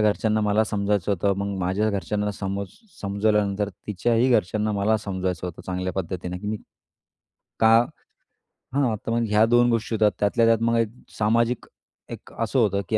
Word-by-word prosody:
घरच्यांना 105 +1 +2
मला 105 +1 +2
समजायचं 100 -1 -1
होतं. 100 +1 +1
मग 100 -1 -2
माझ्या 95 +4 0
घरच्यांना 105 +2 -2
समज 100 0 -4 0.3
समजवल्यानंतर 100 0 +1 0.2
तिच्याही 115 +5 +1
घरच्यांना 105 -1 +1
मला 105 +2 +2
समजवायचं 95 -4 -3
होतं 85 - -8
चांगल्या 90 0 -2
पद्धतीने, 90 0 -4
की 105 - -8
मी 110 +1 -1 1.0
का 110 0 +6 1.1
हां 130 -6 +2
तर - - -2
मग 115 0 +1
ह्या 105 +1 +5
दोन 120 +1 +4
गोष्टी 115 0 -1
होतात. 105 -1 +3
त्यातल्या 105 +3 +2
त्यात 115 -1 +4
मग 115 0 +2
एक 115 - +1 0.3
सामाजिक 115 +3 +1 0.4
एक - - -9
असं 115 +3 -1
होतं, 100 -3 +2
की 110 - +2
105 Hz, 160 wpm, -24 LUFS, 100-110 Hz, 1.1 s, का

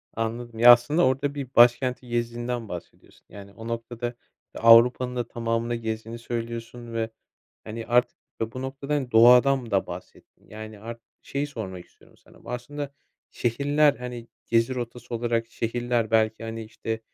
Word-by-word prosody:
Anladım. 115 0 -4
Ya, 120 +1 +10
aslında 145 +7 +4
orada 140 +2 0
bir 140 -2 -4
başkenti 125 +1 +4
gezdiğinden 120 0 -3
bahsediyorsun, 90 -1 -10
yani, 100 -1 -12
o 115 0 -9
noktada 120 +1 -4 0.4
Avrupa'nın 125 +2 +6
da 120 -2 -2
tamamını 115 0 -2
gezdiğini 115 0 -5
söylüyorsun 115 0 -6
ve, 115 0 -1 0.6
hani, 110 +1 -6
artık, 120 +1 +2 0.2
ya, 115 0 -2
bu 130 - -6
noktada, 140 +2 -3
hani, 130 -4 -2
doğadan 125 +2 +6
da 100 -1 +1
bahsettin. 90 +1 -11
Yani, 110 -1 -9
ar 115 +1 -7 0.3
şeyi 140 +1 -3
sormak 95 -10 -7
istiyorum - - -24
sana: - - -21
Aslında 140 +4 -5 0.4
şehirler, 145 +4 +2
hani, 125 -1 -7 0.2
gezi 115 +2 +2
rotası 120 -1 -6
olarak, 115 0 0
şehirler 120 -1 -1
belki, 110 0 +2
hani, 115 0 -5
işte, 110 0 -5
120 Hz, 145 wpm, -25 LUFS, 115-125 Hz, 0.6 s, Ya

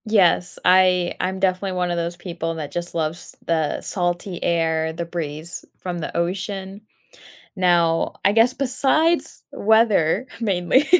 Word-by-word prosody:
Yes, 185 -5 +3
I 180 -1 +4
I'm 190 +1 -2
definitely 190 0 0
one 180 -1 -1
of 175 - -1
those 170 +1 -3
people 170 -2 -4
that 150 -3 -6
just 175 +2 -4
loves 165 +1 -3
the 160 -3 0
salty 175 0 -2
air, 160 -1 0
the 170 +1 -4
breeze 165 -1 -5
from 180 -1 -5
the 155 - -6
ocean. 190 +3 -3 0.8
Now 170 -3 +2
I 195 - +5
guess 230 +4 +4
besides 280 +5 +2
weather, 220 -1 +2
mainly, 205 - +2
180 Hz, 135 wpm, -22 LUFS, 170-195 Hz, 0.8 s, I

